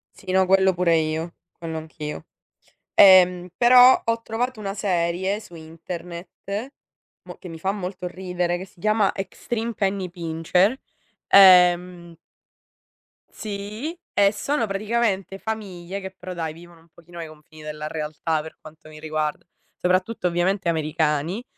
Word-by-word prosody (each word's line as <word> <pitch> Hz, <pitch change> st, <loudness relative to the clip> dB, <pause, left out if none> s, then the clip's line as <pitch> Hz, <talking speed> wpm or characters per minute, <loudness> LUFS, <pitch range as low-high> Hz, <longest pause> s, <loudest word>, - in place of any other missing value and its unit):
Sì 185 Hz, -, -9 dB
no 190 Hz, 0 st, +3 dB
quello 190 Hz, 0 st, +4 dB
pure 175 Hz, -2 st, +2 dB
io. 160 Hz, +2 st, -2 dB, 0.2 s
Quello 160 Hz, -1 st, -6 dB
anch'io. 155 Hz, 0 st, -7 dB, 0.7 s
Ehm, 180 Hz, -2 st, +6 dB
però 250 Hz, +1 st, +7 dB
ho 230 Hz, 0 st, 0 dB
trovato 230 Hz, +1 st, -3 dB
una 195 Hz, -1 st, -4 dB
serie, 190 Hz, 0 st, -1 dB
su 175 Hz, -5 st, -14 dB
internet, 175 Hz, -, -8 dB, 0.5 s
mo -, -, -10 dB
che -, -, -11 dB
mi 165 Hz, -, -8 dB
fa 190 Hz, +3 st, 0 dB
molto 185 Hz, -2 st, -5 dB
ridere, 180 Hz, -1 st, -2 dB
che 185 Hz, -, -7 dB
si 185 Hz, -, -24 dB
chiama 215 Hz, +1 st, +2 dB
Extreme 225 Hz, +4 st, -4 dB
Penny 195 Hz, -3 st, -2 dB
Pincher. 175 Hz, -, 0 dB, 0.5 s
Ehm 180 Hz, -3 st, +5 dB, 1.1 s
Sì, 215 Hz, -, -6 dB, 0.2 s
e 200 Hz, 0 st, +4 dB
sono 240 Hz, +3 st, -1 dB
praticamente 195 Hz, -2 st, -1 dB
famiglie, 195 Hz, -4 st, -6 dB
che 190 Hz, -1 st, -7 dB
però 185 Hz, 0 st, -7 dB
dai 160 Hz, -2 st, -4 dB
vivono 170 Hz, 0 st, -15 dB
un 165 Hz, -, -25 dB
pochino 170 Hz, +1 st, -15 dB
ai 165 Hz, -, -6 dB
confini 155 Hz, 0 st, -16 dB
della 150 Hz, 0 st, -6 dB
realtà, 155 Hz, 0 st, -2 dB
per 160 Hz, -, -11 dB
quanto 155 Hz, 0 st, -15 dB
mi 155 Hz, 0 st, -12 dB
riguarda, 155 Hz, -1 st, -3 dB, 0.3 s
soprattutto 185 Hz, +3 st, 0 dB
ovviamente 180 Hz, +2 st, 0 dB
americani, 155 Hz, +5 st, -1 dB
180 Hz, 140 wpm, -23 LUFS, 165-200 Hz, 1.1 s, però